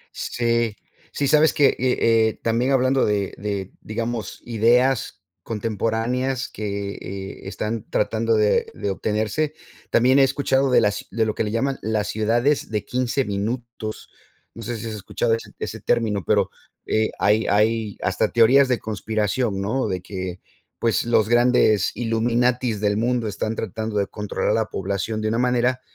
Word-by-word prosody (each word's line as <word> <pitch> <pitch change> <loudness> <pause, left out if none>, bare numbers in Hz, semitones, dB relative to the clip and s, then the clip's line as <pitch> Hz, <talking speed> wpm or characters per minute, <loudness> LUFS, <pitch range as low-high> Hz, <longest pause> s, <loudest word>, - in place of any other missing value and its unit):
Sí, 115 -2 0 0.4
sí, 140 - -1
sabes 155 +2 +5
que 145 -2 +4
y 125 0 +1
eh, 115 -1 +2
también 115 +4 +1
hablando 130 0 +3
de 100 -2 0
de, 100 -2 -3
digamos, 115 -2 -4
ideas 120 +2 +2 0.2
contemporáneas 115 +4 -1
que, 100 -1 -4
eh, 95 0 -7
están 105 +2 -4
tratando 115 +2 +1
de 105 -1 +2
de 100 - -3
obtenerse. 110 +10 -1 0.3
También 130 +3 +4
he - - +7
escuchado 135 0 +2
de 125 - +5
las 100 0 -1
de 110 +2 0
lo 110 - -1
que - - -1
le 105 - -2
llaman 135 +4 -1
las 110 -1 -1
ciudades 120 +7 +1
de 105 -2 -2
15 130 +1 0
minutos. 110 +2 -4 0.4
No 115 - -10
sé 115 +1 -4
si 110 - -7
has 110 - -4
escuchado 105 +3 -1
ese 115 - -3
ese - - -5
término, 110 -5 0
pero, - - +1 0.3
eh, 110 0 +1
hay 105 +2 +2
hay 110 0 +1
hasta - - 0
teorías 130 +4 +5
de 125 -1 +1
conspiración, 110 0 -1
¿no? 115 +7 -1
De 90 -1 -2
que, 95 -1 -6 0.4
pues, 115 -1 +1
los 115 -2 +3
grandes 120 -4 +4
illuminatis 120 0 +1
del 105 -1 +1
mundo 120 0 0
están 110 +2 -3
tratando 110 +1 -3
de 100 - +2
controlar 105 0 -3
a - - +3
la 110 0 +1
población 100 +2 -3
de 110 - 0
una 115 +2 0
manera, 125 0 +1
115 Hz, 160 wpm, -23 LUFS, 105-125 Hz, 0.4 s, he